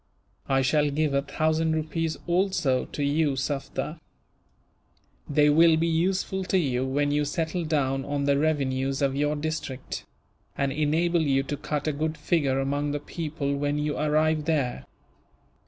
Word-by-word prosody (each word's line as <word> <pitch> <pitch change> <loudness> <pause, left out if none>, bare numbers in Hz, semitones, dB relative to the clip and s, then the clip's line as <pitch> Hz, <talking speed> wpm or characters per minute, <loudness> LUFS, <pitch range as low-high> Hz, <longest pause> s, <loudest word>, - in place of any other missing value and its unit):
"I 135 -1 +3
shall 145 +3 +2
give 150 0 0
a 140 - +2
thousand 160 +2 0
rupees 160 +1 -2
also 175 -7 +1
to 145 - -4
you, 145 0 +1
Sufder. 145 +3 -3 1.3
They 150 0 +4
will 160 +2 +6
be 165 - +1
useful 185 +3 0
to 190 - +1
you, 130 -6 0
when 145 +2 +1
you 150 0 +2
settle 160 +3 -2
down 135 -3 0
on 145 0 -2
the 140 0 +2
revenues 135 -2 0
of 135 -1 +1
your 150 +1 +1
district; 145 -3 -5 0.5
and 140 -1 0
enable 160 +4 +1
you 135 -3 +2
to 145 - -3
cut 150 +1 -3
a 155 - +1
good 155 +2 -2
figure 140 -6 +1
among 145 +2 -1
the 145 - -1
people 145 -2 -3
when 145 +1 -1
you 150 0 -1
arrive 155 0 +1
there." 145 -6 -1
150 Hz, 155 wpm, -26 LUFS, 140-160 Hz, 1.3 s, will